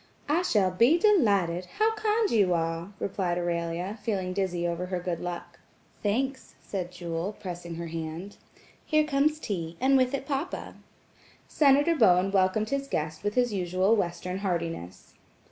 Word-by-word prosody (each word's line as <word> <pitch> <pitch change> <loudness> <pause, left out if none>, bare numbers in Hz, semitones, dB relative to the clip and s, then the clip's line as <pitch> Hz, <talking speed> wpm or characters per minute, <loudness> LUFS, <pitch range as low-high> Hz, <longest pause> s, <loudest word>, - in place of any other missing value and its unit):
"I 305 +4 +2
shall 205 - +2
be 235 - +4
delighted. 200 - +3
How 440 +1 +3
kind 435 0 +1
you 195 -6 +3
are," 165 +2 -2
replied 180 -3 -1
Aurelia, 175 +3 -2
feeling 190 -5 -2
dizzy 180 -3 -1
over 170 +1 -3
her 180 -1 -2
good 175 -1 -3
luck. 175 -1 -6 0.4
"Thanks," 260 +6 -2
said 180 -3 -5
Jewel, 175 +2 -4
pressing 175 -3 -6
her 170 +1 -5
hand. 165 +4 -6 0.5
"Here 310 -1 +3
comes 300 +1 +1
tea, 170 - -4
and 270 +2 +4
with 255 +1 +2
it 275 - -5
papa." 285 +5 -3 0.7
Senator 290 +2 +4
Bowen 195 - +4
welcomed 195 +2 +2
his 275 0 -1
guest 155 - -3
with 205 0 -1
his 245 -3 +2
usual 185 +3 +2
Western 180 -1 -2
heartiness. 165 - -4
190 Hz, 150 wpm, -28 LUFS, 175-265 Hz, 0.7 s, be